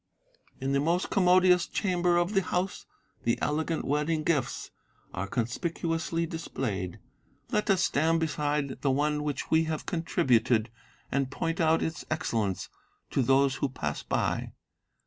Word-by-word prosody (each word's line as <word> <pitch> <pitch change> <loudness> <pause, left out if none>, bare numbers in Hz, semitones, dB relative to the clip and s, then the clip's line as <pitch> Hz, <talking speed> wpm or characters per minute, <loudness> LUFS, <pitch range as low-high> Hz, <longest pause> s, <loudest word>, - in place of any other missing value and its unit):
"In 135 0 -1
the 140 - +3
most 170 +5 0
commodious 180 -2 +5
chamber 180 -3 +1
of 175 +4 +1
the 195 - +4
house 185 +1 -2 0.4
the 115 - +1
elegant 160 +2 -1
wedding 150 +2 0
gifts 150 -6 -1 0.4
are 100 +2 -3
conspicuously 165 - -1
displayed; 120 - -4 0.5
let 210 0 0
us 190 -1 +4
stand 165 +3 +2
beside 150 -3 -1
the 140 - +1
one 150 +2 +1
which 150 -1 -3
we 160 0 +4
have 155 -1 -3
contributed, 125 - +2 0.4
and 135 -1 0
point 165 +4 -2
out 160 0 +3
its 160 - -3
excellence 115 - -1 0.4
to - - +2
those 135 +1 +3
who 140 - 0
pass 130 - -3
by. - - -1
155 Hz, 140 wpm, -29 LUFS, 135-170 Hz, 0.5 s, commodious